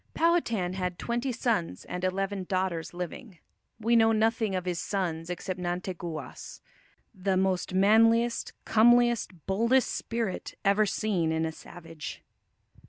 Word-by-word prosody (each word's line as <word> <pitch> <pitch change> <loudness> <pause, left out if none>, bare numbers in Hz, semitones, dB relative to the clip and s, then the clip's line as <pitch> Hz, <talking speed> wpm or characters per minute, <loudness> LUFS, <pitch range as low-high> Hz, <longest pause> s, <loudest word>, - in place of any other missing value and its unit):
Powhatan 235 - +1
had 180 -1 -3
twenty 240 +3 -2
sons 225 - -1
and 180 0 -5
eleven 195 +1 -1
daughters 185 -3 -1
living. 180 +3 -7 0.4
We 230 +2 +2
know 225 -1 +5
nothing 220 -2 +1
of 185 -1 -2
his 175 -2 -2
sons 170 -4 -2
except 180 +1 -4
Nanteguas, 175 -2 -5 0.5
"the 190 -1 0
most 185 -1 0
manliest, 225 +4 +4
comliest, 240 +1 +4
boldest 230 +6 +2
spirit" 230 -5 -3
ever 205 +2 +4
seen 195 -6 0
in 160 0 0
"a 160 - -2
savage." 165 -1 -9
190 Hz, 125 wpm, -28 LUFS, 180-225 Hz, 0.5 s, know